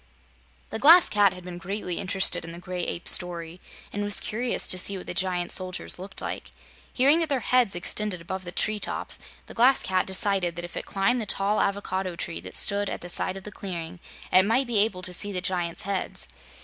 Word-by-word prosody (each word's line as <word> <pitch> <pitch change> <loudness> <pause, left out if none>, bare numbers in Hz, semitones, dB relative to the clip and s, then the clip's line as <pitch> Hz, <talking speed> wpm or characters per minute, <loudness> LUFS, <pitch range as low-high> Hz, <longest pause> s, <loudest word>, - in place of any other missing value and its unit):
The - - -3
Glass 330 +6 +8
Cat 205 -2 +4
had 180 0 -10
been 175 -1 -8
greatly 180 -1 -4
interested 195 -3 +2
in 165 - -8
the - - -8
Gray 180 0 -5
Ape's 170 - 0
story 175 -1 +1 0.3
and 205 - -3
was 205 0 +3
curious 240 +3 0
to 185 - +4
see 195 +2 +1
what 185 - -8
the - - -4
giant 180 -1 -1
soldiers 185 -1 0
looked 195 +2 -2
like. - - -5 0.4
Hearing 280 +6 +4
that 325 -1 -1
their 270 -3 0
heads 245 -6 +2
extended 185 +2 -1
above 190 +3 -6
the 175 - -6
tree 215 +3 0
tops, - - -3 0.3
the - - -11
Glass 255 +3 +4
Cat 185 -1 0
decided 190 -2 0
that 175 0 -5
if 175 - -11
it - - -5
climbed 205 +5 +1
the 215 - -5
tall 200 +2 +1
avocado 190 -2 -2
tree 85 - -5
that 95 +1 -8
stood 205 -1 +2
at - - -5
the 175 - -8
side 185 +2 0
of 190 - -10
the 210 - -8
clearing, 175 -3 -7 0.3
it 185 - +8
might 230 +7 +2
be 235 -4 +1
able 200 -3 +1
to 180 - -5
see 205 +3 0
the 185 - -2
giants' 175 -2 -1
heads. 195 -1 -3
190 Hz, 220 wpm, -26 LUFS, 180-205 Hz, 0.4 s, Glass